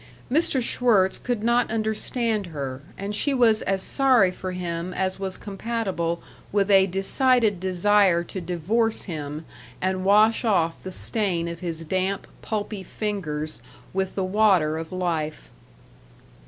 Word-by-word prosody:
Mr. 275 Hz, -3 st, +2 dB
Schwirtz 215 Hz, -6 st, +3 dB
could 240 Hz, -4 st, -2 dB
not 235 Hz, +1 st, +2 dB
understand 220 Hz, -1 st, -1 dB
her, 140 Hz, -5 st, -5 dB, 0.2 s
and 200 Hz, +1 st, -4 dB
she 275 Hz, +6 st, +1 dB
was 225 Hz, -4 st, +4 dB
as 190 Hz, -1 st, 0 dB
sorry 255 Hz, -9 st, +4 dB
for 185 Hz, 0 st, -6 dB
him 180 Hz, 0 st, -4 dB
as 190 Hz, 0 st, -1 dB
was 190 Hz, -1 st, -4 dB
compatible 195 Hz, -5 st, -3 dB, 0.3 s
with 205 Hz, 0 st, +2 dB
a 195 Hz, -1 st, +6 dB
decided 210 Hz, +2 st, +2 dB
desire 185 Hz, -1 st, +3 dB
to 185 Hz, +2 st, -6 dB
divorce 190 Hz, +7 st, 0 dB
him 155 Hz, -3 st, -6 dB, 0.3 s
and 185 Hz, 0 st, -1 dB
wash 215 Hz, +4 st, +4 dB
off 175 Hz, -7 st, +1 dB
the 185 Hz, -, -7 dB
stain 180 Hz, -4 st, -1 dB
of 170 Hz, 0 st, -5 dB
his 165 Hz, -2 st, -4 dB
damp, 190 Hz, +3 st, -1 dB, 0.2 s
pulpy 210 Hz, -2 st, -3 dB
fingers 170 Hz, -8 st, -4 dB, 0.3 s
with 190 Hz, 0 st, -1 dB
the 195 Hz, -, 0 dB
water 185 Hz, -6 st, +3 dB
of 165 Hz, 0 st, -7 dB
life. 165 Hz, -4 st, -3 dB
190 Hz, 140 wpm, -24 LUFS, 170-215 Hz, 0.3 s, a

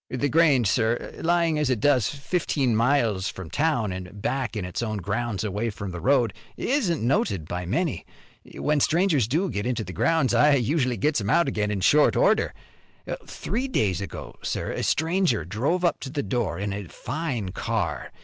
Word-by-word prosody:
"The 135 Hz, +3 st, -1 dB
Grange, 145 Hz, -7 st, +4 dB
sir, 115 Hz, +4 st, 0 dB
lying 170 Hz, -2 st, +2 dB
as 150 Hz, -3 st, +1 dB
it 125 Hz, -4 st, +1 dB
does, 130 Hz, -3 st, +3 dB
fifteen 140 Hz, -4 st, -1 dB
miles 115 Hz, -5 st, +2 dB
from 90 Hz, -4 st, -8 dB
town 120 Hz, -, +1 dB
an' 90 Hz, 0 st, -6 dB
back 120 Hz, +3 st, -2 dB
in 100 Hz, -, -3 dB
its 90 Hz, +4 st, -4 dB
own 110 Hz, -2 st, -2 dB
grounds 105 Hz, +2 st, -2 dB
away 105 Hz, +2 st, -2 dB
from 100 Hz, -2 st, -6 dB
the 85 Hz, -1 st, -6 dB
road, 125 Hz, -7 st, +3 dB, 0.2 s
isn't 215 Hz, -, 0 dB
noted 100 Hz, -, 0 dB
by 90 Hz, 0 st, -4 dB
many. 155 Hz, -, -1 dB, 0.5 s
When 150 Hz, 0 st, +1 dB
strangers 160 Hz, -, +2 dB
do 165 Hz, +10 st, +1 dB
get 100 Hz, +3 st, -2 dB
into 120 Hz, -3 st, -1 dB
the 90 Hz, -2 st, -8 dB
grounds 130 Hz, -, +2 dB
I 145 Hz, +5 st, +5 dB
usually 130 Hz, -1 st, +1 dB
gets 150 Hz, -5 st, +1 dB
'em 100 Hz, -, -3 dB
out 170 Hz, +5 st, +4 dB
again 105 Hz, -5 st, -1 dB
in 100 Hz, -2 st, -2 dB
short 150 Hz, +10 st, +4 dB
order. -, -, +3 dB, 0.8 s
Three 240 Hz, +9 st, -3 dB
days 100 Hz, -, 0 dB
ago, 100 Hz, -, -7 dB
sir, -, -, -3 dB
a -, -, -3 dB
stranger 160 Hz, -, +1 dB
drove 140 Hz, -, 0 dB
up 175 Hz, -, +1 dB
to 135 Hz, -, -6 dB
the 145 Hz, +1 st, -2 dB
door 105 Hz, -3 st, -1 dB
in 100 Hz, +1 st, -3 dB
a 100 Hz, 0 st, -5 dB
fine 130 Hz, -, -4 dB
car. -, -, -3 dB
120 Hz, 185 wpm, -25 LUFS, 100-150 Hz, 0.8 s, I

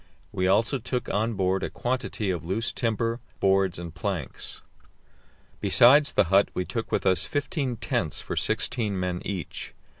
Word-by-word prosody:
We 95 Hz, 0 st, 0 dB
also 115 Hz, +7 st, +2 dB
took 125 Hz, +2 st, -3 dB
on 110 Hz, +2 st, 0 dB
board 95 Hz, 0 st, +1 dB
a -, -, -2 dB
quantity 120 Hz, -5 st, -2 dB
of 90 Hz, -, -3 dB
loose 110 Hz, +8 st, -1 dB
timber, 115 Hz, 0 st, -1 dB, 0.2 s
boards 95 Hz, -2 st, +2 dB
and 85 Hz, -2 st, -7 dB
planks. 85 Hz, -5 st, -5 dB, 1.0 s
Besides 140 Hz, +5 st, +5 dB
the -, -, +5 dB
hut 100 Hz, +1 st, +5 dB
we 90 Hz, -, -1 dB
took 115 Hz, -1 st, -4 dB
with -, -, 0 dB
us 95 Hz, -1 st, +4 dB
fifteen 145 Hz, -3 st, -2 dB
tents 120 Hz, -, -1 dB
for -, -, -5 dB
sixteen 105 Hz, -5 st, 0 dB
men 90 Hz, -1 st, -2 dB
each. 95 Hz, -5 st, -5 dB
105 Hz, 155 wpm, -26 LUFS, 95-120 Hz, 1.0 s, Besides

